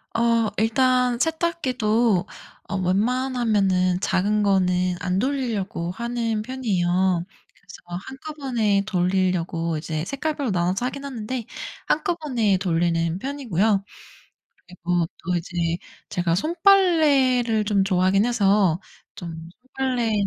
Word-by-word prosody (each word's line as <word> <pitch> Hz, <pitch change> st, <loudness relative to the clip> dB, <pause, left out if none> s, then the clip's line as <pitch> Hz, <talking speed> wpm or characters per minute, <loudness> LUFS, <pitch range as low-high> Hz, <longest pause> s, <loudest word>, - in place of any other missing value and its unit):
어 230 Hz, -1 st, +2 dB
일단 250 Hz, +2 st, +2 dB
세탁기도 250 Hz, -, +1 dB, 0.4 s
어 -, -, -2 dB
웬만하면은 200 Hz, -3 st, +1 dB
작은 210 Hz, +3 st, +1 dB
거는 180 Hz, -2 st, +2 dB
안 180 Hz, +1 st, -1 dB
돌리려고 220 Hz, -10 st, -2 dB
하는 230 Hz, 0 st, -2 dB
편이에요. 185 Hz, -7 st, 0 dB, 0.3 s
그래서 180 Hz, -4 st, -15 dB, 0.3 s
한꺼번에 265 Hz, -8 st, -1 dB
돌리려고 180 Hz, -3 st, 0 dB
이제 155 Hz, 0 st, -3 dB
색깔별로 280 Hz, 0 st, -2 dB
나눠서 185 Hz, +6 st, 0 dB
하긴 275 Hz, +2 st, -4 dB
하는데 240 Hz, -2 st, -4 dB, 0.4 s
한꺼번에 295 Hz, -, +1 dB
돌리는 170 Hz, -1 st, 0 dB
편이고요. 220 Hz, -, 0 dB, 0.8 s
그리고 175 Hz, -1 st, -1 dB, 0.2 s
또 180 Hz, +1 st, -1 dB
이제 170 Hz, -1 st, -2 dB, 0.3 s
제가 175 Hz, -2 st, 0 dB
손빨래를 290 Hz, -, +3 dB
좀 200 Hz, -2 st, +2 dB
좋아하긴 190 Hz, +1 st, +2 dB
해서 200 Hz, -7 st, +2 dB, 0.4 s
좀 165 Hz, -1 st, -8 dB, 0.3 s
손빨래 250 Hz, -4 st, 0 dB
210 Hz, 260 characters per minute, -23 LUFS, 180-255 Hz, 0.8 s, 손빨래를